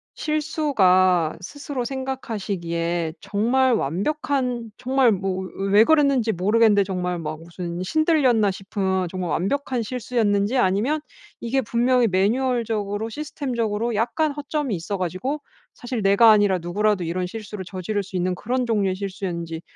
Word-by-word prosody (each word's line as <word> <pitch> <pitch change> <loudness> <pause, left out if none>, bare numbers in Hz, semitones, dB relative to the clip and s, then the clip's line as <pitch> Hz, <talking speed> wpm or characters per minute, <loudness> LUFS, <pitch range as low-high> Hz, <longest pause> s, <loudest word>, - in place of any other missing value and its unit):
실수가 185 - +2
스스로 275 +4 -5
생각하시기에 190 - -3
정말 245 +5 +2
완벽한 245 - -1
정말 260 -1 +3
뭐 190 -1 -1
왜 195 +1 -4
왜 210 +2 +8
그랬는지 280 -7 +3
모르겠는데 205 +2 +3
정말 180 -2 -2
막 155 -1 -5
무슨 170 +1 -6
신들렸나 260 - +2
싶은 190 -1 -2
정말 180 -3 -4
완벽한 250 - -1
실수였는지 220 -2 0
아니면 230 +11 +1 0.4
이게 255 +3 0
분명히 240 +1 +2
매뉴얼적으로 220 0 0
시스템적으로 235 -5 -2
약간 245 +8 +1
허점이 290 -4 -2
있어 175 +4 -4
가지고 185 - -3 0.3
사실 245 -3 -4
내가 200 +4 +6
아니라 205 -3 +4
누구라도 195 +3 0
이런 175 +2 -2
실수를 210 0 -7
저지를 195 +3 -3
수 190 0 -10
있는 180 0 0
그런 245 +6 -2
종류의 205 -4 +1
실수였는지 180 -4 -5
210 Hz, 345 characters per minute, -23 LUFS, 185-250 Hz, 0.4 s, 왜